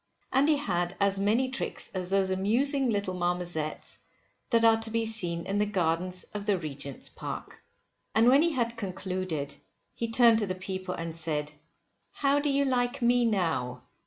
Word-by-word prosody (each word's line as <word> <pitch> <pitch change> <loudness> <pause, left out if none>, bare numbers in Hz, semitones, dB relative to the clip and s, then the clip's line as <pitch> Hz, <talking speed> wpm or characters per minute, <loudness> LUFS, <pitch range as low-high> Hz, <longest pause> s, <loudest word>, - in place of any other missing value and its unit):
And 275 +4 +4
he 305 - +4
had 175 -8 -1
as 200 -1 +2
many 225 +6 +2
tricks 260 - -3
as 185 -2 -3
those 195 -1 +2
amusing 245 +8 +2
little 200 -4 -1
marmozettes 175 -3 -2 0.5
that 230 -2 +4
are 225 0 +5
to 225 - -3
be 230 0 0
seen 175 -7 -2
in 200 +1 -1
the 210 - +2
gardens 180 -1 -1
of 205 0 -5
the 205 -2 +3
Regent's 140 -4 -6
Park. - - -7 0.5
And 225 +2 +5
when 270 +4 +7
he 335 0 +2
had 235 -3 -1
concluded 185 -7 -3 0.4
he 230 - -3
turned 230 -1 +6
to 210 - -1
the 185 - -2
people 185 -1 -4
and 165 -1 -5
said, 150 -2 -3 0.6
how 280 0 +2
do 290 0 0
you 280 0 +2
like 245 -2 0
me 240 0 +4
now? 160 - 0
200 Hz, 175 wpm, -29 LUFS, 175-235 Hz, 0.6 s, when